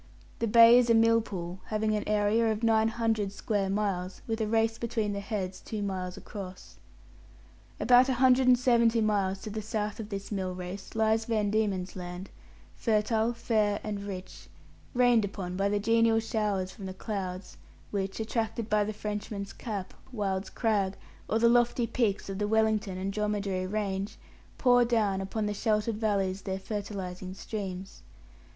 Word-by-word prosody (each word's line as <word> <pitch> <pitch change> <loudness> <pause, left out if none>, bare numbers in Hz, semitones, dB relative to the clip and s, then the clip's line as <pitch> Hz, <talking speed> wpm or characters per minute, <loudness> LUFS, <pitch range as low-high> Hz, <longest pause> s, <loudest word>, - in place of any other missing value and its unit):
The 230 - 0
Bay 230 +2 +8
is 245 -1 +1
a 230 - +6
millpool, 220 -6 +1
having 215 0 0
an 210 - -1
area 215 +2 +2
of 215 +1 -3
nine 220 -1 +4
hundred 225 -3 0
square 200 -1 -1
miles, 195 -2 -2
with 225 -1 -2
a 215 - 0
race 225 +1 +1
between 220 -3 -1
the 200 - -3
heads 200 -3 -4
two 215 -2 -4
miles 185 -1 -3
across. 190 -2 -9 1.0
About 250 +1 +6
a 260 - +2
hundred 255 +1 +4
and 250 -1 +7
seventy 235 -2 +3
miles 200 -3 +1
to 215 - -5
the 215 +1 -3
south 215 -1 -3
of 215 -1 -6
this 200 -1 -6
mill 190 -2 -2
race 185 +3 -7
lies 220 0 +2
Van 215 -3 0
Diemen's 200 -4 0
Land, 180 +1 -7 0.4
fertile, 220 +1 +1
fair, 215 -3 +1
and 205 -1 -3
rich, 190 -2 -8 0.5
rained 245 -3 +5
upon 190 -3 -4
by 195 +1 +1
the 205 - +1
genial 230 +1 +3
showers 210 -4 -1
from 195 -2 -8
the 185 - -7
clouds 190 -2 -5 0.3
which, 195 0 -2
attracted 225 0 -2
by 210 -1 +4
the 215 +1 -3
Frenchman's 205 -1 -5
Cap, 205 -6 -5 0.2
Wyld's 195 -4 -2
Crag, 205 -4 0 0.3
or 220 - +2
the 235 +1 +4
lofty 240 0 +3
peaks 225 -4 0
of 195 0 -5
the 210 - 0
Wellington 215 -3 +1
and 195 +1 -3
Dromedary 205 -3 -1
range, 200 0 -2 0.4
pour 245 -2 +5
down 215 -5 +1
upon 210 +3 -2
the 210 - -1
sheltered 215 +1 0
valleys 200 -3 0
their 190 0 -3
fertilizing 190 -3 -5
streams. 195 -2 -6
210 Hz, 165 wpm, -29 LUFS, 195-225 Hz, 1.0 s, Bay